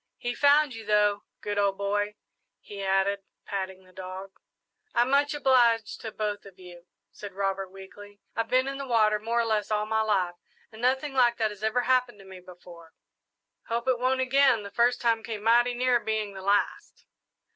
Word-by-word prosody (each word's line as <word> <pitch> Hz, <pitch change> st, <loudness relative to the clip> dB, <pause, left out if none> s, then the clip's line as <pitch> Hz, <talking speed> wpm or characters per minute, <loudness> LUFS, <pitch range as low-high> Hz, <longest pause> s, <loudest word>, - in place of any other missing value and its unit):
He 245 Hz, -1 st, -3 dB
found 285 Hz, +1 st, +4 dB
you, 225 Hz, -1 st, -8 dB
though. 210 Hz, -1 st, +2 dB, 0.2 s
Good 205 Hz, 0 st, -2 dB
old 200 Hz, -1 st, +1 dB
boy," 205 Hz, +1 st, -1 dB, 0.4 s
he 200 Hz, -1 st, -9 dB
added, 195 Hz, +1 st, +1 dB, 0.2 s
patting 190 Hz, -1 st, -5 dB
the 185 Hz, 0 st, -21 dB
dog. 185 Hz, +1 st, -8 dB, 0.6 s
"I'm 240 Hz, +2 st, +2 dB
much 285 Hz, +1 st, +2 dB
obliged 240 Hz, -6 st, +2 dB
to 220 Hz, -, -6 dB
both 210 Hz, -1 st, -3 dB
of 195 Hz, -2 st, -15 dB
you," 175 Hz, -1 st, -14 dB, 0.2 s
said 205 Hz, -2 st, -9 dB
Robert 195 Hz, -1 st, -2 dB
weakly. 200 Hz, +2 st, -13 dB, 0.2 s
"I've 230 Hz, 0 st, -1 dB
been 255 Hz, +2 st, +2 dB
in 275 Hz, 0 st, -4 dB
the 275 Hz, -, -5 dB
water 215 Hz, -3 st, +3 dB
more 230 Hz, +2 st, -1 dB
or -, -, -1 dB
less 215 Hz, -2 st, 0 dB
all 210 Hz, -1 st, 0 dB
my 220 Hz, 0 st, 0 dB
life, 195 Hz, -5 st, +1 dB, 0.4 s
and 220 Hz, 0 st, -12 dB
nothing 265 Hz, +3 st, +1 dB
like 245 Hz, -3 st, +3 dB
that 220 Hz, -2 st, 0 dB
ever 220 Hz, +3 st, +1 dB
happened 250 Hz, -2 st, +1 dB
to 195 Hz, -, -15 dB
me 190 Hz, -1 st, -11 dB
before." 175 Hz, -2 st, -14 dB, 0.7 s
"Hope 235 Hz, +2 st, -2 dB
it 255 Hz, -2 st, +2 dB
won't 260 Hz, +1 st, +1 dB
again 260 Hz, -3 st, +3 dB
the 200 Hz, -, -9 dB
first 240 Hz, +1 st, +2 dB
time 230 Hz, -2 st, +2 dB
came 220 Hz, -2 st, -6 dB
mighty 240 Hz, +2 st, +4 dB
near 250 Hz, 0 st, +2 dB
being 215 Hz, -2 st, -2 dB
the 190 Hz, -, -8 dB
last." 200 Hz, +2 st, -1 dB
215 Hz, 190 wpm, -27 LUFS, 200-245 Hz, 0.7 s, found